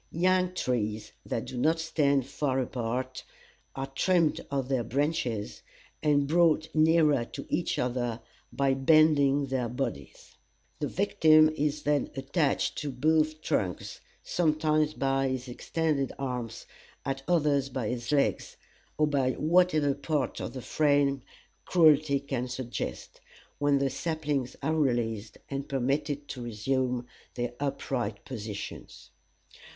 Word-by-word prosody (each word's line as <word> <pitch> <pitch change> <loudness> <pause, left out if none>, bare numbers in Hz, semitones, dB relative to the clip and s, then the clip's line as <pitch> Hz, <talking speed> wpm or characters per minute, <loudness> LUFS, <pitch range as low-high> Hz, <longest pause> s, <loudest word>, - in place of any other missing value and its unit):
Young 185 +1 +2
trees 110 -7 -2 0.2
that 115 - -2
do 125 - -6
not 160 +5 +2
stand 140 -5 +1
far 135 -1 -1
apart 130 +1 -3 0.5
are 135 - -3
trimmed 165 +4 +1
of 135 -2 -1
their 130 -3 0
branches, 125 -5 -2 0.4
and 145 -2 +3
brought 160 0 +3
nearer 155 -4 +4
to - - -8
each 170 +2 -1
other 120 -2 -1 0.3
by 135 -1 +1
bending 145 0 +4
their 130 -3 -2
bodies; 120 - -5 0.4
the - - -1
victim 155 -5 +4
is 150 0 -1
then 145 -2 +1
attached 140 +2 0
to 150 - -3
both 155 +3 +1
trunks, 90 -4 -2 0.2
sometimes 155 -2 +1
by 135 0 +1
his 130 -1 -3
extended 145 +2 -1
arms, 125 -4 -4 0.4
at 135 0 -2
others 145 -6 +2
by 125 -4 -3
his 120 0 -3
legs, 140 -2 0 0.4
or 155 - +4
by 135 -3 +1
whatever 155 -3 +3
part 145 -3 -2
of - - -5
the 130 -2 -7
frame 145 -2 +2 0.4
cruelty 155 -4 +4
can 135 -3 -3
suggest, 125 - -5 0.4
when 145 -1 +3
the 135 -1 0
saplings 150 -5 -2
are 155 +3 +1
released, 120 -7 -1
and 140 +1 -5
permitted 145 +2 -1
to 125 - -6
resume 125 +2 -1 0.3
their 120 -1 -3
upright 130 -6 -3
positions. 110 -5 -7
140 Hz, 125 wpm, -28 LUFS, 125-155 Hz, 0.5 s, nearer